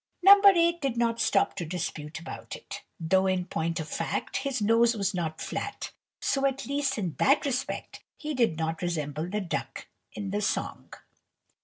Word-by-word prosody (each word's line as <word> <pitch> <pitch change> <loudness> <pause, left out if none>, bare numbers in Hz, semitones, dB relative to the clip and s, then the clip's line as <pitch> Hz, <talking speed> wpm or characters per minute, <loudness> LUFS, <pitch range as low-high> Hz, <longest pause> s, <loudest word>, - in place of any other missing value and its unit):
No. 400 +1 +9
8 340 -3 +5
did 270 -4 -1
not 235 -1 +1
stop - - +2
to - - -2
dispute 160 -2 -4
about 165 - -8
it, - - -9 0.2
though, 190 +3 +2
in 185 -1 0
point 165 0 -2
of 160 - -4
fact, 165 +1 -2
his 270 -2 -2
nose 230 +2 +4
was 200 0 0
not 160 -3 -3
flat, - - -4 0.3
so 275 0 +1
at 270 0 -3
least 280 -1 -1
in 180 -7 -2
that 280 +2 +4
respect 265 -1 -3
he 305 -1 -4
did 235 - +2
not 160 0 -2
resemble 155 -2 -2
the 210 +2 -1
duck 180 - -4 0.3
in 200 -2 -5
the 205 +1 -1
song. 210 - -2
205 Hz, 175 wpm, -28 LUFS, 165-270 Hz, 0.3 s, No